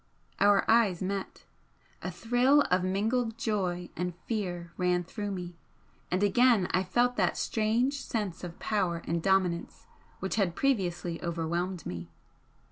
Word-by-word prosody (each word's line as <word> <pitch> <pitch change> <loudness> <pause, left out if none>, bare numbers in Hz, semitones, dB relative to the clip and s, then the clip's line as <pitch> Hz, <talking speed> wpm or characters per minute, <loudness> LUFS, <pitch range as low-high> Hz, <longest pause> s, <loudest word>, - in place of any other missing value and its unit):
Our 205 -1 +5
eyes 210 -6 +3
met. 195 0 -4 0.6
A - - -3
thrill 250 +5 +3
of 180 0 +3
mingled 225 +5 0
joy 185 -6 -2
and 180 -1 -3
fear 175 -6 -3
ran 180 -1 +1
through 205 +4 -5
me, 180 -3 -5 0.6
and 185 +3 +1
again 220 -1 +4
I 185 - +2
felt 245 +6 +1
that 180 -4 +1
strange 235 +6 +1
sense 205 -7 -3
of 175 -1 -7
power 180 -6 -1
and 170 0 -1
dominance 185 -2 0 0.3
which 190 +3 -2
had 185 -5 +1
previously 175 - 0
overwhelmed 170 +1 -2
me. 85 -1 -6
190 Hz, 135 wpm, -29 LUFS, 175-220 Hz, 0.6 s, Our